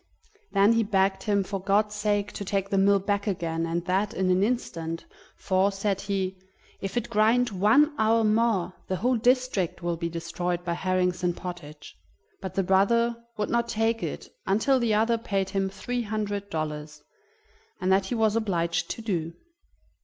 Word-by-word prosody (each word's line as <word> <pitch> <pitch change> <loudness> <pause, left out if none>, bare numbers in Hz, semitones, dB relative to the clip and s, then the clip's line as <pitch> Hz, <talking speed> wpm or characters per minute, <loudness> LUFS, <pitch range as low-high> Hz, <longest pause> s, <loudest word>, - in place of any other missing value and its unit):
Then 200 +2 +5
he 230 - +3
begged 195 -2 +1
him, 200 -2 +1
for 195 0 -4
God's 205 +2 +2
sake, 205 -1 0
to - - -6
take 195 0 -2
the 195 - +2
mill 200 +1 +5
back 200 +1 -1
again, 165 -4 -1
and 170 +1 -2
that 195 +3 0
in 185 0 +1
an 180 +1 +3
instant, 170 -8 -2 0.3
for, 190 +1 +1
said 195 0 -1
he: 190 -1 -2 0.4
"If 195 +4 -4
it 240 -1 -1
grind 230 +3 +3
one 220 +11 +4
hour 225 +1 +3
more 215 -4 +2
the 190 - -1
whole 245 +8 +1
district 240 -8 +1
will 175 -1 -1
be 170 0 -2
destroyed 170 +1 -3
by 170 - 0
herrings 180 0 0
and 175 -1 0
pottage." 165 -5 -8 0.5
But 190 - -6
the 195 - +2
brother 235 +6 +3 0.2
would 210 - -2
not 235 0 +1
take 225 0 0
it - - -5 0.2
until 220 +7 +3
the 230 -3 +2
other 225 +2 +2
paid 195 -4 -2
him 195 -1 0
three 245 +5 -3
hundred 205 -2 -3
dollars, 150 -2 -5 0.8
and 185 - 0
that 190 0 +3
he 240 - -2
was 220 -1 +2
obliged 170 -6 0
to 230 - -5
do. 170 -6 -2
195 Hz, 175 wpm, -26 LUFS, 180-220 Hz, 0.8 s, Then